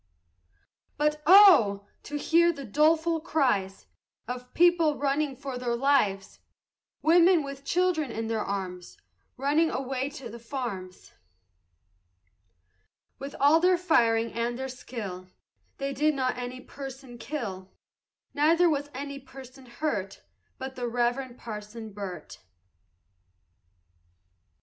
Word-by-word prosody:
But 300 +1 0
oh! 295 - +7 0.2
to 295 - -5
hear 340 +3 +3
the 280 -4 -8
doleful 320 +6 +2
cries 245 - 0 0.4
Of 250 +1 -6
people 335 -3 +4
running 280 0 0
for 270 -2 -6
their 240 -1 -1
lives! 235 -7 +1 0.6
Women, 340 0 +5
with 275 0 -8
children 345 -4 +1
in 225 0 -4
their 225 -1 -1
arms, 185 -3 -5 0.4
Running 295 +5 +2
away 265 0 -3
to 270 -3 -9
the 235 +1 -10
farms! 230 -7 -6 2.1
With 275 +1 -7
all 290 +4 +5
their 360 +1 +4
firing 230 -10 +2
and 235 +1 -2
their 265 +1 -4
skill 210 -8 -7 0.5
They 275 0 -3
did 300 +3 +1
not 255 -2 0
any 250 +1 -6
person 270 -3 -10
kill; 225 -8 -5 0.6
Neither 330 +4 +4
was 290 -1 -2
any 280 +1 -6
person 265 -1 -13
hurt 230 -7 -4 0.3
But 265 0 -7
the 245 -1 -3
Reverend 245 +1 -1
Parson 215 0 -8
Burt. 190 -6 -8
265 Hz, 115 wpm, -27 LUFS, 230-300 Hz, 2.1 s, oh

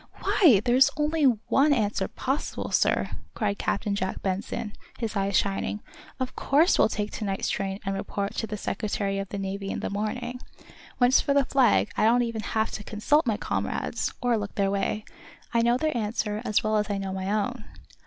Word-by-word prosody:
"Why, 245 - +5
there's 255 +2 +5
only 300 0 +1
one 265 +4 +3
answer 215 -5 0
possible, 270 +3 -3
sir," - - +2 0.2
cried 205 -3 -1
Captain 205 0 -1
Jack 190 -1 -3
Benson, 205 +3 -3 0.2
his 225 -2 -3
eyes 195 -1 +1
shining. 200 +1 -1 0.4
"Of 255 -1 -3
course 305 +6 +3
we'll - - +5
take 210 -1 -3
to - - -5
night's 195 -1 -1
train 195 0 -2
and 195 - -1
report 200 0 -3
to 225 - -1
the 210 - -4
Secretary 200 -1 -2
of 195 -1 -5
the 200 - -4
Navy 195 0 -4
in - - -3
the - - -3
morning. 240 +4 -3 0.6
When 245 -1 +4
it's 260 - +5
for 280 - 0
the 280 -1 +4
Flag 245 -6 +3
I - - +3
don't 240 +2 +4
even 230 -2 -3
have 220 0 -1
to 210 - -6
consult 250 +9 +1
my 215 -3 +1
comrades, - - -2
or 245 -2 +3
look 205 -1 -6
their 195 -1 +1
way. 200 +2 -1 0.5
I 230 - +4
know 235 +1 +3
their 310 +1 -1
answer 210 -1 -1
as 215 -4 +1
well 215 0 +1
as 210 0 0
I 200 - -1
know 195 -1 -3
my 190 +1 -3
own." 215 +3 -1
215 Hz, 200 wpm, -26 LUFS, 200-245 Hz, 0.6 s, Why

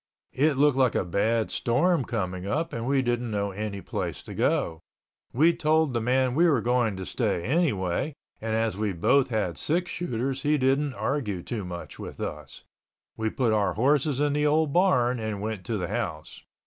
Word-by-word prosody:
It 150 +3 +3
looked 145 -1 +4
like 130 -3 +3
a - - +1
bad 110 +5 0
storm 140 +5 +1
coming 95 -4 -3
up 160 +10 -1
and 115 +1 -3
we 135 -1 +2
didn't 120 -1 -1
know 100 -2 -1
any 100 0 -4
place - - -4
to - - -9
go. 80 -1 0 0.5
We 160 +7 +4
told 155 -3 +2
the 115 - 0
man 130 +2 +2
we 170 +6 +4
were 140 -6 +3
going 120 -2 +1
to 95 0 -6
stay 85 - -1
anyway, 135 - 0 0.3
and 110 0 -1
as 110 -2 0
we 105 -1 -1
both 130 +11 +3
had 105 -8 -1
six 175 +4 0
shooters 135 -4 -2
he 150 +1 +2
didn't 135 +1 +1
argue 105 -13 -2
too 110 -5 -4
much 85 -1 -8
with - - -8
us. 75 -2 -6 0.5
We 110 0 -1
put 115 -1 0
our 105 -2 +1
horses 140 +3 +2
in 145 -1 +2
the 150 +1 +2
old 155 -1 +2
barn 125 -10 +3
and 110 -2 -3
went 105 -2 -4
to 115 -3 -1
the 90 -2 -3
house. 80 -6 -4
120 Hz, 190 wpm, -26 LUFS, 105-145 Hz, 0.5 s, looked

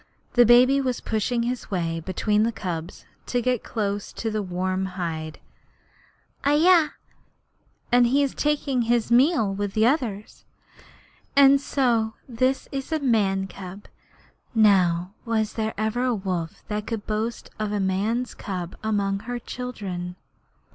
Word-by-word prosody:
The 240 -2 +6
baby 255 +3 +6
was 255 -2 -1
pushing 235 +2 -1
his 245 +1 -3
way 165 -4 -1
between 200 +5 0
the 230 +2 +2
cubs 175 -5 -6 0.2
to 245 - 0
get 250 -1 0
close 205 -2 -3
to 225 - -3
the 215 0 -1
warm 185 0 -2
hide. 160 -3 -4 1.0
'Ahai! 315 +3 +5 1.0
He 245 +3 +4
is 275 - -1
taking 285 -4 0
his 235 0 +1
meal 245 - +4
with 200 0 -3
the 220 0 +4
others. 235 -7 -1 0.9
And 275 0 +7
so 235 -6 +1
this 255 +2 0
is 270 +2 -5
a 315 - +1
man's 195 -8 +1
cub. 190 +3 -9 0.7
Now, 185 -4 +3
was 220 -2 -1
there 220 -1 -2
ever 220 +3 -1
a 250 -2 +1
wolf 180 -5 -4
that 210 0 -3
could 225 -3 -4
boast 220 +2 -3
of 215 -1 -2
a 210 - -1
man's 205 +6 0
cub 180 -3 -5
among 200 -2 0
her 245 +3 -5
children?' 200 -8 -6
220 Hz, 140 wpm, -24 LUFS, 195-245 Hz, 1.0 s, And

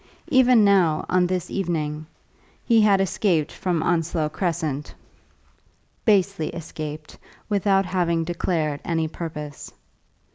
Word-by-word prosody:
Even 255 -4 +5
now, 180 -6 +3
on 180 -1 +3
this 180 -1 -3
evening, 155 -5 -2 0.6
he 230 -2 +4
had 205 -2 +4
escaped 180 -4 +1
from 175 -4 -2
Onslow 165 -2 0
Crescent, 160 -4 -3 1.1
basely 200 -6 +2
escaped, 155 -2 -7 0.3
without 195 -1 +2
having 175 -2 0
declared 160 -3 -1
any 165 -2 -1
purpose. 150 -3 -7
170 Hz, 105 wpm, -23 LUFS, 155-195 Hz, 1.1 s, Even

